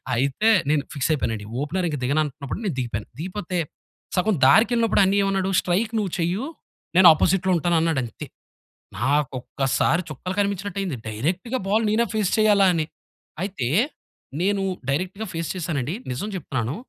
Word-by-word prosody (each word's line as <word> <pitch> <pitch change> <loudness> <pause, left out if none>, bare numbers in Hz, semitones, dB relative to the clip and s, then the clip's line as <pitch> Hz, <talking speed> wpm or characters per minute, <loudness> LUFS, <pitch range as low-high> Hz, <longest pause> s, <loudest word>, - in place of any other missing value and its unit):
అయితే 140 - +2 0.2
నేను 150 -2 +2
ఫిక్స్ 140 +1 0
అయిపోయానండి, 115 -7 -2 0.2
ఓపెనర్ 180 +5 -1
ఇంక 150 - -2
దిగనంటన్నప్పుడు, 145 +2 -1
నేను 190 - 0
దిగిపోయాను. 115 -4 -3
దిగిపోతే 180 +1 -3 0.6
సగం 200 +3 +2
దారికెళ్ళినప్పుడు 230 -1 +4
అన్నియ్యేమన్నాడు, 195 -1 +1
"స్ట్రైక్ 210 +6 0
నువ్వు 200 -4 -2
చెయ్యు 180 +9 0 0.5
నేను 185 -1 +9
అపోజిట్‌లో 185 +4 +1
ఉంటాను" 170 +1 +1
అన్నాడు 160 -4 +1
అంతే. 115 - -9 0.7
నాకు 140 +4 +1
ఒక్కసారి 135 +6 +1
చుక్కలు 180 +6 -5
కనిపించినట్టయింది. 195 -5 -2
డైరెక్ట్‌గా 175 - -2
బాల్ 220 +2 +2
నేనే 230 +2 +2
ఫేస్ 210 -4 +1
చేయాలా 205 -2 +5
అని. 160 -2 0 0.6
అయితే 190 -11 -3 0.7
నేను 200 +1 +1 0.3
డైరెక్ట్‌గా 185 +9 -2
ఫేస్ 165 -1 -3
చేశానండి. 155 -5 -2 0.2
నిజం 135 +12 -3
చెప్తున్నాను, 130 -5 -3
175 Hz, 135 wpm, -23 LUFS, 140-200 Hz, 0.7 s, నేను